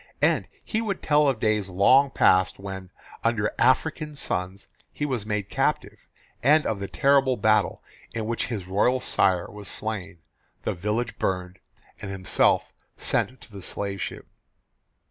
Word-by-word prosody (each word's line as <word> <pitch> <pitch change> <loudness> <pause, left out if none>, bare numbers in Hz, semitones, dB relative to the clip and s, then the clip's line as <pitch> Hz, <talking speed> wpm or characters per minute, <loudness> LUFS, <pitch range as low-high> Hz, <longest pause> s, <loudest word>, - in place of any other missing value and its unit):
And - - +3 0.2
he 220 - -1
would 210 -4 -3
tell 150 -1 +4
of 130 -5 +1
days 105 -3 +1
long 130 +10 +5
past 95 -7 +3
when, 95 -1 -7 0.3
under 115 -2 +1
African 150 +5 +2
suns, 95 -7 -3 0.2
he 145 - -3
was 125 -7 -2
made 105 -2 -2
captive, - - -1 0.3
and 150 +4 +4
of 110 - -1
the 100 - -4
terrible 135 0 +3
battle 110 0 +2 0.3
in 110 -2 -3
which 115 +1 -1
his 105 -7 -4
royal 105 +7 +2
sire 90 -7 +2
was 105 -1 -10
slain, 100 -4 -5 0.5
the - - -1
village 105 +5 -2
burned, 90 0 -2 0.4
and 100 - -6
himself 95 -1 +1 0.2
sent 130 - 0
to - - -15
the 100 -1 -9
slave 100 +1 -4
ship. - - -5
105 Hz, 150 wpm, -25 LUFS, 95-130 Hz, 0.5 s, long